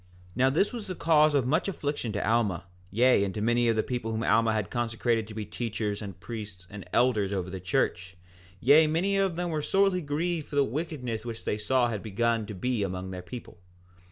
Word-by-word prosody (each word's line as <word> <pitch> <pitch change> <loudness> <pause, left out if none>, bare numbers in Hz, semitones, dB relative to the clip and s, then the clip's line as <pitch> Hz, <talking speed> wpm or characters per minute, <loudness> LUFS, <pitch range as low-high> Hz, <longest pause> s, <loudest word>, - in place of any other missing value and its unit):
4:7 - - -24
Now 130 +1 +4
this 180 - +1
was 230 -4 -6
the 185 - -4
cause 155 -3 +4
of 135 -4 +2
much 155 +9 +1
affliction 145 - -2
to 100 -1 -2
Alma, 105 -6 +1 0.3
yea, 120 +1 +4
and 95 -1 -3
to - - -2
many 120 +1 +2
of 115 - +3
the 110 - +1
people 120 -3 -3
whom 110 +1 -2
Alma 115 0 +3
had 110 -4 -2
consecrated 115 -1 0
to 110 - -10
be 110 -1 -4
teachers, 110 -3 -3
and 100 -4 -8
priests, 100 -1 -8
and 100 -3 -9
elders 110 -6 +2
over 95 -2 -2
the 95 - -5
church; 90 +1 -1 0.4
yea, 150 - +6
many 175 +6 +1
of 195 -3 +1
them 175 0 -2
were 155 -1 -1
sorely 195 +2 +2
grieved 160 +2 -2
for - - -7
the 140 - +5
wickedness 125 -4 -4
which 115 -1 -6
they 105 - -1
saw 125 +3 +2
had 110 -4 -3
begun 115 +1 0
to 105 - -6
be 125 +3 -1
among 95 -1 -3
their 90 -1 -6
people. 105 -1 -10
115 Hz, 220 wpm, -28 LUFS, 105-145 Hz, 0.4 s, yea